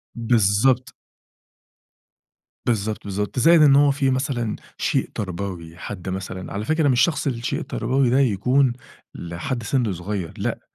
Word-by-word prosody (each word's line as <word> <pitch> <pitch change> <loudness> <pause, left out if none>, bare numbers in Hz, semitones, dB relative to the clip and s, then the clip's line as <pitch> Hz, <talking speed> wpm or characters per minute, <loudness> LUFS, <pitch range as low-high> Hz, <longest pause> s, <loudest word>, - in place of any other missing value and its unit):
بالضبط. 120 +3 +2 1.7
بالضبط، 110 -2 -1
بالضبط، 105 +5 -3
زائد 165 +3 +6
إن 145 -2 +7
هو 145 0 +5
في 135 -1 +1
مثلًا 130 -4 -1 0.2
شيء - - 0
تربوي، 90 -4 -5
حد 95 -1 -6
مثلًا، 95 0 -5
على 105 +2 -3
فكرة 160 +2 +2
مش 130 -2 +3
شخص 160 -4 +1
الشيء 120 -2 -2
التربوي 135 -1 0
ده 130 +3 +3
يكون 130 +2 +2 0.4
لحد 85 +9 -4
سن 120 -4 0
صغير، 90 0 -4
لأ، - - -2
120 Hz, 135 wpm, -22 LUFS, 100-135 Hz, 1.7 s, إن